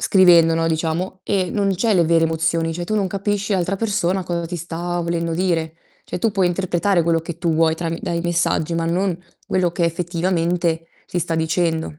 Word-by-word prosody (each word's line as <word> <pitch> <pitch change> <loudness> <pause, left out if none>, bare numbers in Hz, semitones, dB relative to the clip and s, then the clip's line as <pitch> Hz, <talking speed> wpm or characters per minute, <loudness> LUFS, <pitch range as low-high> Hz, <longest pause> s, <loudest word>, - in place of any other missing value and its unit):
scrivendo 170 -4 +5
no, 165 0 0
diciamo, 165 +3 -2
e 185 -3 0
non 200 -2 +1
c'hai 220 +1 +2
le 170 -2 +4
vere 165 0 +3
emozioni, 165 0 0
cioè, 175 +1 -4
tu 215 - -2
non 200 -2 +1
capisci 200 +1 -2
l'altra 190 +1 0
persona 195 -3 0
cosa 170 -1 -3
ti 175 +1 -5
sta 175 +1 -4
volendo 170 -1 -2
dire. 165 -3 0 0.3
Cioè, - - -5
tu 225 +4 +1
puoi 195 -3 +1
interpretare 175 0 +1
quello 165 0 +2
che 165 0 -7
tu 170 -1 0
vuoi 160 0 +3
trami 165 0 -3
dai 170 0 -2
messaggi, 175 -1 0
ma 165 0 -1
non 185 +2 0 0.3
quello 180 -2 +1
che 175 -1 0
effettivamente 170 -1 0 0.2
ti 180 - -3
sta 165 -1 -2
dicendo. 160 -1 -1
170 Hz, 195 wpm, -20 LUFS, 165-185 Hz, 0.3 s, scrivendo